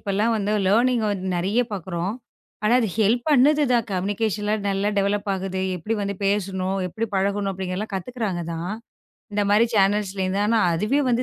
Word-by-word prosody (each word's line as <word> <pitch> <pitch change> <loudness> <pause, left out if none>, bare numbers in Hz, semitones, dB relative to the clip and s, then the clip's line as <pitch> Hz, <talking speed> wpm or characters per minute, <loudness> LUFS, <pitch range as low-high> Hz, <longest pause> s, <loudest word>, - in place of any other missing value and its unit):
இப்ப 200 - -4
எல்லாம் 220 +3 +2
வந்து 205 0 -1 0.2
லேர்னிங் 235 +2 +3
வந் 195 -2 -2
நிறைய 195 +7 +1
பாக்குறோம். 185 0 -3 0.5
ஆனா, 215 - +3
அது 225 - 0
ஹெல்ப் 225 +3 +2
பண்ணுது 295 +2 +5
தான். 235 -3 +2
கம்னிகேஷன்லாம் 205 +2 -1
நல்லா 195 +1 0
டெவலப் 200 +1 0
ஆகுது. 190 0 -3 0.2
எப்படி 220 +7 -2
வந்து 200 0 -3
பேசணும்? 195 -1 -1
எப்படி 225 +5 -3
பழகணும்? 200 +1 0
அப்படிங்கறதலாம் 190 +2 -4
கத்துக்குறாங்க 195 -2 -3
தான். 170 +4 -4 0.6
இந்த 205 - +2
மாதிரி 210 +3 +5
சேனல்ஸ்ல 195 -1 +2
இருந்து. 195 +2 0
ஆனா 225 +1 +3
அதுவே 215 - +1
வந்து, 240 +1 +2
205 Hz, 165 wpm, -23 LUFS, 190-220 Hz, 0.6 s, பண்ணுது